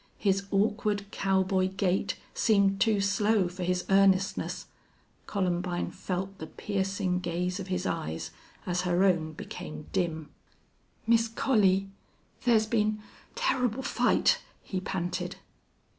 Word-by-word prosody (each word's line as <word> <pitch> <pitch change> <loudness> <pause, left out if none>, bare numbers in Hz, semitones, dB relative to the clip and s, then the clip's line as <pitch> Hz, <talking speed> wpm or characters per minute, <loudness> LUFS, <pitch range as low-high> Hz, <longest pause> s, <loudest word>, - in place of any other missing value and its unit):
His 195 -1 +1
awkward, 205 0 +1
cowboy 190 -1 +1
gait 190 0 0 0.2
seemed 200 -3 +3
too 220 -3 +3
slow 205 0 +2
for 180 +1 -8
his 180 0 0
earnestness. 195 0 +2 0.6
Columbine 180 -2 -1
felt 190 +1 -4
the 160 - -6
piercing 195 -2 -1
gaze 180 +1 -2
of 195 - -5
his 185 0 -2
eyes 80 +1 -3 0.3
as 180 0 0
her 180 +1 +2
own 165 -5 +2
became 155 0 -7
dim. 160 -5 -2 0.7
"Miss 230 0 +4
Collie, 200 -5 +2 0.5
thar's 225 -3 +3
been 215 -1 +1 0.4
turrible 265 - 0
fight!" - - +2 0.2
he 190 - -3
panted. 180 -2 -3
195 Hz, 115 wpm, -29 LUFS, 180-205 Hz, 0.7 s, Miss